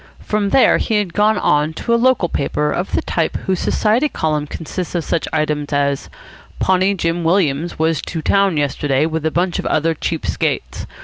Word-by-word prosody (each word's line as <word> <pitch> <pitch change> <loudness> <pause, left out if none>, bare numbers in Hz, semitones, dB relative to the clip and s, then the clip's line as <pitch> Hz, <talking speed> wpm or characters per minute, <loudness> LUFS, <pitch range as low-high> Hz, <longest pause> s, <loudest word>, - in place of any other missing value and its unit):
From 210 -1 0
there 265 - +4
he 225 - -1
had 205 -5 0
gone 165 -8 +2
to 235 - -1
a - - +5
local 240 -5 +3
paper 150 0 -1
of 180 +4 -3
the - - +1
type 165 -2 -1
whose 190 -1 0
Society 235 +8 +1
column 150 - -1
consists 175 +4 -5
of 170 - 0
such 165 - -1
items 150 -1 -1
as 140 -1 0 0.5
"Pawnee 190 +1 +2
Jim 170 -1 -1
Williams 165 -2 +1
was 160 0 +1
to 160 -3 -5
town 195 -2 +2
yesterday 145 0 0
with 160 -1 -2
a - - +2
bunch 175 +2 -1
of - - -4
other 165 +2 +1
cheap 160 +1 -3
skates. - - -2
165 Hz, 185 wpm, -18 LUFS, 150-195 Hz, 0.5 s, a